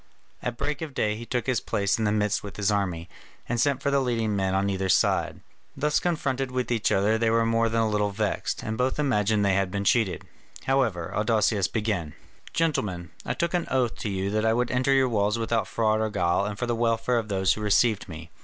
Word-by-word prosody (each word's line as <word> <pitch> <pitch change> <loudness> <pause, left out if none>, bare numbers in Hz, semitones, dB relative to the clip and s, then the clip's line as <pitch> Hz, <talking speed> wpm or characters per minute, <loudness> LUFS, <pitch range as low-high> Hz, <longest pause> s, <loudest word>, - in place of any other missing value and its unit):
At 120 -1 -4
break 145 +1 -3
of 150 -4 -6
day 105 0 0
he 115 +2 -8
took 125 -2 -1
his 130 -3 +1
place 100 +1 0
in 110 - 0
the 105 - +2
midst 105 -1 +1
with 100 - -9
his 105 0 +1
army, 90 -5 -1 0.4
and 120 0 0
sent 140 -1 +1
for 140 - +1
the 140 - +3
leading 115 -5 0
men 95 -1 0
on 100 +1 +1
either 95 -1 -1
side. - - +2 0.4
Thus 150 0 +1
confronted 135 -6 -1
with 125 -1 -2
each 115 -3 +1
other 105 +3 +2
they 115 0 +2
were 115 0 +2
more 115 0 +2
than 115 0 +1
a 110 - +2
little 105 -1 +1
vexed, 105 +1 -2
and 110 +1 -4
both 130 +1 +1
imagined 110 -7 +1
they 100 - +3
had 95 -1 +1
been 100 +2 -3
cheated. 110 -4 +1 0.4
However, 120 -11 0
Adousius 105 -3 +2
began: 105 -9 -2 0.4
"Gentlemen, 100 - -1 0.2
I - - -1
took 170 +1 -1
an 175 -1 0
oath 125 -3 +1
to 105 - -4
you 95 0 -2
that 110 0 0
I 110 0 +3
would 120 +1 0
enter 125 +2 +1
your 135 -1 +4
walls 105 -1 +1
without 115 0 -1
fraud 110 -1 +1
or 110 - 0
guile 90 -2 +1
and 105 0 -4
for 120 - -2
the 120 - -1
welfare 115 +1 +1
of 110 - -5
those 95 -2 +2
who 110 - -6
received 105 0 +2
me. 80 0 -9
110 Hz, 230 wpm, -26 LUFS, 100-125 Hz, 0.4 s, your